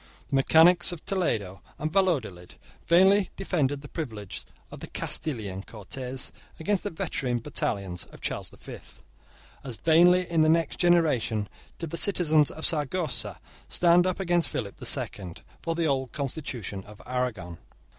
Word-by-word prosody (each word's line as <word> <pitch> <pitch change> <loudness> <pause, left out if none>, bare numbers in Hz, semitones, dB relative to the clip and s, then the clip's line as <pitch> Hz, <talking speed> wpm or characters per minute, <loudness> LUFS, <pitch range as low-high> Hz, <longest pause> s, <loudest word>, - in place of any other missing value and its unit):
The - - -1
mechanics 165 +6 +5
of 175 -3 -8
Toledo 110 - -1 0.2
and 155 +1 -3
Valladolid 130 - 0 0.3
vainly 190 +4 +5
defended 145 -8 -1
the - - -8
privileges 110 - -6 0.2
of - - -9
the - - -8
Castilian 105 -10 -3
Cortes 125 +6 -5 0.3
against 195 +4 0
the 205 - -2
veteran 130 -7 -2
battalions 100 -5 -3
of - - -15
Charles - - -3
the - - -17
Fifth. - - -12 0.6
As 130 -4 -4
vainly, 175 +5 +4
in 165 -2 +1
the 155 - +4
next 165 +1 +1
generation, 150 -12 +2 0.3
did 165 -3 -6
the 170 - -1
citizens 160 -7 +4
of 160 - -3
Saragossa 155 +2 +1 0.3
stand 175 +1 +4
up 185 - -2
against 175 -3 +2
Philip 100 -5 -5
the - - -5
Second, 90 -3 -2 0.2
for 165 -1 -2
the 170 0 0
old 135 -4 -1
constitution 125 - -4
of 105 0 -14
Aragon. 115 -10 -3
150 Hz, 150 wpm, -27 LUFS, 115-175 Hz, 0.6 s, mechanics